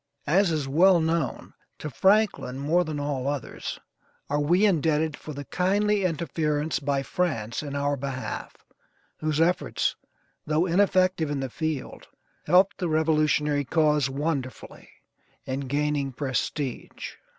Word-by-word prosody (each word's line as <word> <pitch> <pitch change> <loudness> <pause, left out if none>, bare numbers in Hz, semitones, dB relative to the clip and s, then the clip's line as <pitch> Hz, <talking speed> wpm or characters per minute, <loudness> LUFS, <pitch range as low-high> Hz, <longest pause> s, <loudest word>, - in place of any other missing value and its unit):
As 185 +5 +3
is 155 -4 -1
well 175 +6 +5
known, 160 -3 -1 0.2
to 150 - -6
Franklin 200 - +2
more 155 +6 +2
than 155 -3 -4
all 140 -2 -2
others, 140 -3 -4 0.5
are 145 - +2
we 175 +8 +3
indebted 160 -4 +2
for 155 - -9
the 145 -1 -7
kindly 200 +4 +1
interference 155 -2 -1
by 140 -2 -1
France 115 -11 -2
in 145 -2 -6
our 145 0 0
behalf, 135 -1 -5 0.6
whose 155 -1 -1
efforts, 170 +2 +1 0.5
though 155 +3 +1
ineffective 185 -3 +2
in 145 -1 -2
the 135 -2 -4
field, 155 -2 -4 0.4
helped 190 +2 +4
the 180 -3 -1
revolutionary 155 -2 +2
cause 150 -1 +2
wonderfully 140 -2 -4 0.6
in 130 +1 -3
gaining 145 0 0
prestige. 135 0 -3
150 Hz, 130 wpm, -26 LUFS, 140-170 Hz, 0.6 s, well